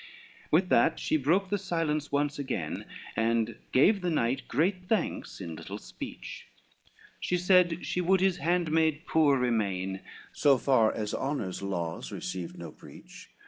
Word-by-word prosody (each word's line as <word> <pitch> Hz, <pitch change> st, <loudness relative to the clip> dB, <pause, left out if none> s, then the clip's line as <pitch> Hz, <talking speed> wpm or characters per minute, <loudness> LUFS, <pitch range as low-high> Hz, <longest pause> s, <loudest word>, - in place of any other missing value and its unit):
LXXXV -, -, -19 dB
With 180 Hz, +4 st, +3 dB
that 165 Hz, -, +3 dB
she -, -, 0 dB
broke 170 Hz, +7 st, +2 dB
the 205 Hz, -, 0 dB
silence 165 Hz, -5 st, -1 dB
once 145 Hz, 0 st, 0 dB
again, 140 Hz, -, -3 dB, 0.3 s
And 115 Hz, 0 st, 0 dB
gave 195 Hz, +10 st, +4 dB
the 180 Hz, -, 0 dB
knight 135 Hz, -4 st, 0 dB
great 180 Hz, +3 st, 0 dB
thanks 215 Hz, -5 st, -1 dB
in 85 Hz, -4 st, -6 dB
little -, -, -7 dB
speech, -, -, -9 dB, 0.7 s
She 180 Hz, -, 0 dB
said 180 Hz, -2 st, +3 dB
she 180 Hz, -, -1 dB
would 190 Hz, +2 st, +3 dB
his 190 Hz, -1 st, +2 dB
handmaid 160 Hz, -3 st, +1 dB
poor 150 Hz, -4 st, +3 dB
remain, 100 Hz, -6 st, -1 dB, 0.3 s
So 140 Hz, -2 st, +4 dB
far 120 Hz, -4 st, +3 dB
as 105 Hz, -1 st, -4 dB
honor's 135 Hz, -11 st, -3 dB
laws 85 Hz, -4 st, -4 dB
received 90 Hz, -3 st, -5 dB
no -, -, -8 dB
breach. -, -, -14 dB
150 Hz, 150 wpm, -29 LUFS, 115-180 Hz, 0.7 s, gave